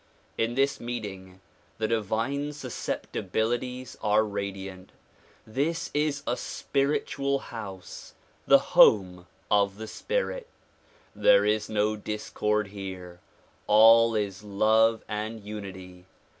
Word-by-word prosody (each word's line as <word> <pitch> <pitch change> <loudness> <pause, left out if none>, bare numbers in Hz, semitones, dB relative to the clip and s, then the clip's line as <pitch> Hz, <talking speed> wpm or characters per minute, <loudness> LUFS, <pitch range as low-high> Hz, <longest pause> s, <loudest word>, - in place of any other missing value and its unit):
In 115 +1 -1
this 135 +1 +1
meeting, 95 -6 -7 0.4
the 110 - 0
divine 115 +7 -1
susceptibilities 125 -1 -3
are 105 +1 +3
radiant. 95 -2 -6 0.5
This 150 +9 -2
is 145 -1 0
a 120 - 0
spiritual 140 0 -1
house; 100 -8 -9 0.3
the - - +8 0.2
home 90 -4 +5 0.2
of 100 -1 +3
the 110 - -6
spirit. - - -3 0.7
There 100 0 +5
is 105 0 0
no 105 0 +1
discord 105 0 -2
here; 95 -3 -8 0.5
all 115 +2 +7
is 100 -2 -2
love 110 +2 +2
and 110 +2 -4
unity. 95 -4 -9
110 Hz, 100 wpm, -27 LUFS, 100-120 Hz, 0.7 s, the